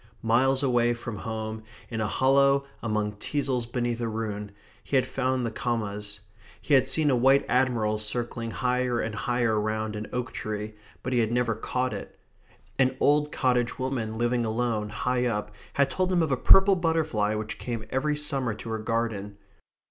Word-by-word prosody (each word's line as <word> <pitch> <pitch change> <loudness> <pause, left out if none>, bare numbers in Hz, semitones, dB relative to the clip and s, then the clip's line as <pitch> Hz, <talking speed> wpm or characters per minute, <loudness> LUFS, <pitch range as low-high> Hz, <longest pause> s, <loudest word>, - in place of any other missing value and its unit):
Miles 130 +4 +3
away 120 -2 +3
from 115 -1 -6
home, 110 +1 -4 0.3
in 115 -2 -3
a 110 - +1
hollow 140 +4 +3 0.2
among 105 -2 -1
teasles 130 -1 -1
beneath 120 -1 -1
a 115 - 0
ruin, 105 -2 -4 0.3
he - - -3
had 130 - +4
found 130 -1 -1
the 115 - -2
commas. 105 -3 -3 0.4
He 150 - -1
had 130 -1 +5
seen 145 +2 +2
a - - +4
white 135 +3 +4
admiral 115 -4 +1
circling 115 +1 -3
higher 125 0 0
and 110 - -2
higher 120 -1 +1
round 110 0 -2
an 105 +1 -5
oak 125 0 -3
tree, 105 0 -4 0.3
but 130 - -2
he 125 - +3
had 115 -1 +1
never 120 -1 +1
caught 125 +3 -2
it. - - -8 0.6
An 130 0 +3
old 150 +1 +3
cottage 125 -3 +1
woman 120 -4 -2
living 120 +1 +1
alone, 110 -1 -1
high 125 +3 0
up, 105 -3 -2 0.2
had 140 0 +2
told 185 0 0
him 175 -2 +3
of 155 - -1
a - - +4
purple 195 +9 +6
butterfly 160 - +1
which 110 0 -4
came 115 -3 -4
every 150 +3 +1
summer 135 -6 -1
to 115 - -8
her 110 0 -2
garden. 110 -3 -2
120 Hz, 180 wpm, -27 LUFS, 110-130 Hz, 0.6 s, purple